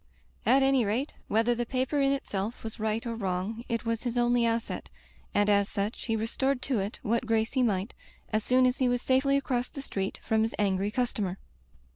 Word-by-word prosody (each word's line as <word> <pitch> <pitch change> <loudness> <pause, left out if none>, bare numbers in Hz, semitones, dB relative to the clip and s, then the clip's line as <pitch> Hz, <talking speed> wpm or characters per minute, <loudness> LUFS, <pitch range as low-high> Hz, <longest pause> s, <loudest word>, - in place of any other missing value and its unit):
At 270 +1 +5
any 270 -2 +4
rate, 230 +8 -1
whether 225 +3 +2
the 240 0 -1
paper 260 +4 0
in 275 0 +3
itself 220 -5 -3
was 225 +1 -6
right 220 +2 -1
or 235 - -2
wrong, 200 +2 -2
it 230 0 -1
was 230 -1 -1
his 245 -1 -2
only 240 -1 +3
asset, 230 0 -2 0.4
and 205 0 +2
as 200 -1 +3
such 205 +2 -3
he 225 - 0
restored 250 +5 0
to 260 -6 0
it 195 +2 -3
what 235 +2 0
grace 225 0 +1
he 260 - +2
might, 205 -2 0 0.4
as 215 0 +2
soon 255 +2 +4
as 255 +1 +1
he 255 -2 +3
was 245 0 0
safely 270 +1 +3
across 250 -3 -1
the 275 - -7
street 195 -6 -3
from 220 0 +2
his 225 +1 0
angry 195 -1 +1
customer. 210 -5 -1
230 Hz, 205 wpm, -29 LUFS, 210-255 Hz, 0.4 s, At